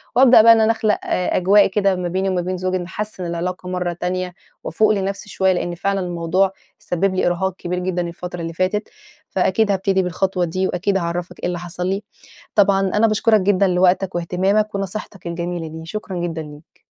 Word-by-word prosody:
وابدأ 250 -2 +8
بقى 230 +1 +8
إن 225 - +3
أنا 220 - +4
أخلق 220 -1 +1
أجواء 190 +3 +3
كده 195 0 +1
ما 180 -1 -3
بيني 190 +2 -1
وما 185 -1 0
بين 185 +1 -3
زوجي 185 +1 -1
نحسِّن 185 +1 -5
العلاقة 180 +2 -4
مرّة 180 -1 -2
تانية 180 +1 -3 0.3
وافوق 215 +6 +2
لنفسي 200 0 -2
شوية 190 -1 +2
لإن 175 -1 -2
فعلًا 195 +3 -1
الموضوع 180 +1 0 0.3
سبِّب 185 +2 -1
لي 185 - +1
إرهاق 180 +1 0
كبير 180 0 -3
جدًا 180 0 -1
الفترة 175 +1 -7
اللي 165 0 -5
فاتت. 185 +5 -1 0.4
فأكيد 205 +2 +1
هابتدي 195 0 +1
بالخطوة 180 0 0
دي 185 +3 -1
وأكيد 195 +2 0
هاعرّفك 175 0 -4
إيه - - -4
اللي 175 -1 -3
حصل 175 +1 -5
لي. 195 +2 -1 0.5
طبعًا 200 -2 +4
أنا 210 +3 +2
باشكُرك 215 0 +3
جدًا 195 0 +3
لوقتك 180 +1 +2
واهتمامك 190 +5 0
ونصيحتك 195 -1 -5
الجميلة 170 0 -4
دي، 160 +1 -8
شكرًا 195 +1 -5
جدًا 170 -2 -3
ليك. 150 0 -13
185 Hz, 185 wpm, -20 LUFS, 175-195 Hz, 0.5 s, وابدأ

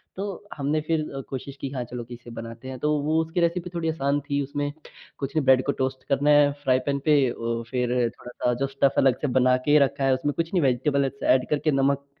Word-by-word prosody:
तो 200 +1 -5
हमने 150 +2 -1
फ़िर 155 0 0 0.3
कोशिश 135 +1 -6
की 135 - -3
हाँ, 130 -3 -4
चलो 120 0 -6
कि 120 +1 -11
इसे 120 0 -11
बनाते 115 +2 -8
हैं। 130 - -6
तो 150 - +1
वो 155 +2 +2
उसकी 160 +2 -3
रेसिपी 170 +1 0
थोड़ी 165 -1 -1
आसान 145 -2 0
थी, 145 0 -1
उसमें 145 +1 -3 0.5
कुछ 140 +3 -4
नहीं 150 -4 +1
ब्रेड 130 -1 +5
को - - +2
टोस्ट 130 0 -2
करना 140 +2 +2
है 145 -1 +6
फ्राई 130 -2 +3
पेन 140 0 +1
पे 145 -4 +4
अ, - - -3
वो 115 0 -2
फ़िर 125 -2 -1 0.3
थोड़ा-सा 125 0 -2
जो 135 - +1
स्टफ 135 0 +1
अलग 130 -2 +3
से 150 - 0
बना 125 0 +4
के 145 +1 +6
रखा 140 +1 -4
है। 135 - +4
उसमें 140 +3 -1
कुछ 165 +2 -2
नहीं 180 - +3
वेजिटेबल 135 +2 +1
अलग 140 0 -2
से - - +4
एड 130 -1 0
करके 150 +1 +1
नमक 140 +1 +1
140 Hz, 245 wpm, -25 LUFS, 130-150 Hz, 0.5 s, है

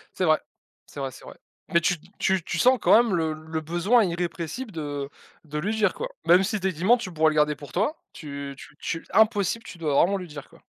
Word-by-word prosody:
C'est 185 - 0
vrai, 155 -2 +4 0.5
c'est 145 - -9
vrai, 135 -1 -2
c'est - - -14
vrai. - - -11 0.4
Mais 170 - +5
tu 175 - +2 0.2
tu 190 -2 +1
tu 160 - -3
sens 255 +4 +5
quand - - +6
même 230 -4 +3
le 160 -2 0
le 160 +1 -5
besoin 175 +9 +2
irrépressible, 175 - -4
de 145 -4 -4 0.3
de 150 -1 -5
lui 210 +8 -1
dire 210 -1 +2
quoi. - - -4 0.2
Même 180 +2 +6
si 215 +2 -1
tu 190 - -2
es - - -1
tu 170 +2 -6
mens, 240 +4 +6
tu 210 -7 -6
pourrais 155 0 +3
le 155 - -3
garder 150 0 +3
pour 145 -4 -12
toi, 220 - 0 0.2
tu 140 -3 -7
tu 140 - -14
tu 165 - -4
impossible, 220 0 +3
tu 185 - -10
dois 155 -4 -1
vraiment 190 +7 +4
lui 180 -3 -6
dire 145 -2 -9
quoi. - - -20
170 Hz, 245 wpm, -25 LUFS, 155-205 Hz, 0.5 s, quand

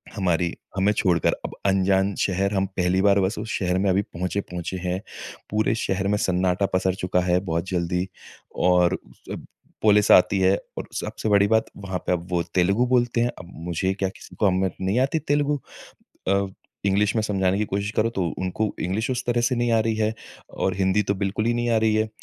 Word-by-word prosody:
हमारी 90 -3 0 0.2
हमें 95 +2 +3
छोड़कर। 90 -6 +2
अब - - -6
अनजान 95 0 +2
शहर, 100 +1 0
हम 95 -1 +1
पहली 90 +1 +2
बार 100 0 +4
बस 95 +4 0
उस 110 +2 -5
शहर 90 -1 0
में 100 0 +2
अभी 95 +2 +3
पहुँचे 90 +1 -3
पहुँचे 90 -1 -5
हैं। 90 +2 -1 0.5
पूरे 110 +1 +1
शहर 95 +1 -1
में 105 +1 +2
सन्नाटा 90 +1 +1
पसर 95 0 +1
चुका 90 -1 0
है 90 0 +2
बहुत 85 +3 -1
जल्दी, 90 0 -1 0.5
और 90 -1 +3 0.3
जब - - -7 0.4
पुलिस 105 -1 +4
आती 95 +2 +6
है 95 +1 +4 0.2
और - - -5
सबसे 110 - -3
बड़ी 100 -1 +5
बात 110 +1 +3
वहाँ 95 -2 -4
पे - - +2
अब 90 -1 -1
वो 85 - +2
तेलुगु 100 +6 +3
बोलते 120 -1 +2
हैं। 120 - +2
अब 90 -1 -11 0.2
मुझे 90 +3 0
क्या 95 -1 -1
किसी - - -14
को - - 0
हम 95 0 +2 0.2
नहीं 95 +6 +1
आती 135 +5 +1
तेलुगु। 145 -1 0 0.7
अब 100 0 +1 0.3
इंग्लिश 100 +3 +2
में 110 - +2
समझाने 95 -2 +1
की 105 - 0
कोशिश 100 +1 -2
करो 110 +1 +2
तो 95 -6 -2
उनको 95 +3 -1
इंग्लिश 105 +7 -1
उस 125 - -2
तरह 120 0 +1
से 125 +2 +1
नहीं 120 0 +1
आ 115 - +4
रही 110 0 0
है 110 0 0 0.4
और 95 - -1
हिंदी 95 +2 +2
तो 100 - 0
बिल्कुल 100 +2 -1
ही 120 - +2
नहीं 120 0 -1
आ 115 - +3
रही 110 -1 +2
है। 110 0 +1
100 Hz, 210 wpm, -24 LUFS, 95-110 Hz, 0.7 s, आती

